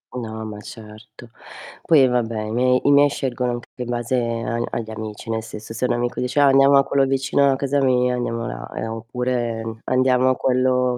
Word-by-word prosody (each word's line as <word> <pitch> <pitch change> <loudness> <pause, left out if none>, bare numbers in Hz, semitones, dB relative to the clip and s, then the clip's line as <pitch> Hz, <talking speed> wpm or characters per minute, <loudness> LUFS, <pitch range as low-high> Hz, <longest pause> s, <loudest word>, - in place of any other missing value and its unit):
No, 110 -2 -5
ma 105 -1 -7
certo. 110 +2 -13 0.5
Poi 140 -5 +5
vabbè, 115 -3 -1
i 110 - -5
miei 125 +2 +2
i - - +5
miei 145 0 +6
scelgono 125 -3 -2
anche 120 0 -7
più 125 - -6
in 120 - -8
base 120 +1 -1
agl 115 -1 -2
agli 110 -1 -5
amici, 110 0 -7
nel 110 0 -1
senso 110 0 -9
se 115 +3 -2
un - - +1
amico 120 0 -2
dice: 125 +3 -1
"Ah 145 - +6
andiamo 135 +1 +6
a 140 - +5
quello 135 0 +1
vicino 135 +1 +2
a - - +1
casa 140 +1 0
mia," 125 -1 +2
andiamo 115 -1 -3
là. - - -7
Ehm, 110 - -4
oppure 120 0 -3 0.2
andiamo 130 0 +2
a 130 - +2
quello 125 0 +1
125 Hz, 210 wpm, -21 LUFS, 115-130 Hz, 0.5 s, miei